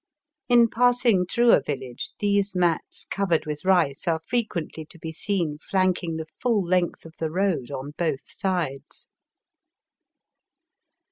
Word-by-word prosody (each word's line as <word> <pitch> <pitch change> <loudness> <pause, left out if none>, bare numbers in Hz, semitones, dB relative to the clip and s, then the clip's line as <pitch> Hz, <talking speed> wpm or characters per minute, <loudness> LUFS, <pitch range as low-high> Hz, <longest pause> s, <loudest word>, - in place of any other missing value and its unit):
In 240 -1 +6
passing 235 -5 +3
through 235 +4 +4
a - - +6
village 130 -4 -5
these 200 -1 +1
mats 175 -3 0
covered 175 -5 0
with 150 -1 -5
rice 175 -8 +2
are 165 -1 +2
frequently 210 -9 -2
to 170 - -13
be 160 0 -6
seen 165 -3 -2
flanking 185 -2 0
the 160 0 -4
fall 225 -6 +1
length 175 -1 0
of 160 - -11
the 160 - -1
road 180 -7 0
on 140 0 -5
both 160 -6 0
sides. 175 -9 -3
175 Hz, 135 wpm, -25 LUFS, 160-200 Hz, -, In